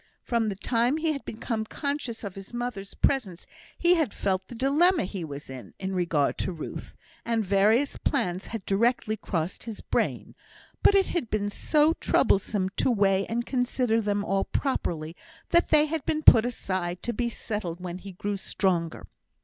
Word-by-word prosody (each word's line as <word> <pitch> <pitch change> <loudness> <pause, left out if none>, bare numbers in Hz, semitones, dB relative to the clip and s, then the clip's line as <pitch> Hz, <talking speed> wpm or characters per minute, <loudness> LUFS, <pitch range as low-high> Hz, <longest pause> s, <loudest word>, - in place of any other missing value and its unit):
From 230 -2 0
the 200 - -3
time 240 +7 +1
he 320 0 0
had 280 - -6
become 220 0 -3
conscious 280 -1 -4
of 200 -3 -5
his 195 +5 -9
mother's 240 -5 -4
presence, 210 -11 0 0.3
he 350 0 +4
had 320 - 0
felt 190 -1 -1
the 240 - -9
dilemma 295 - +3
he 185 -1 -5
was 145 -2 -7
in 130 -2 -10
in 190 0 -4
regard 170 -6 +1
to - - -1
Ruth, 165 -3 -7 0.3
and 225 -2 0
various 210 +8 +3
plans 180 +2 -1
had 225 -4 -6
directly 215 +2 +1
crossed 180 -4 -3
his 225 -3 -6
brain; - - -2 0.5
but 405 - +5
it 390 -1 +4
had 315 -11 -2
been 205 -1 -1
so 305 +7 +3
troublesome 195 - +1
to - - +2
weigh 195 -4 +2
and 235 +1 -2
consider 245 -3 +1
them 205 -1 -1
all 195 -1 +1
properly, 165 - -2 0.3
that 340 0 +3
they 300 -1 +5
had 310 -1 -3
been 310 +3 -1
put 230 -3 +8
aside 185 -6 -3
to 240 - -2
be 240 +1 -1
settled 205 -7 -4
when 180 0 -6
he 195 0 -9
grew 200 +3 -3
stronger. 175 -4 -1
215 Hz, 175 wpm, -27 LUFS, 190-250 Hz, 0.5 s, put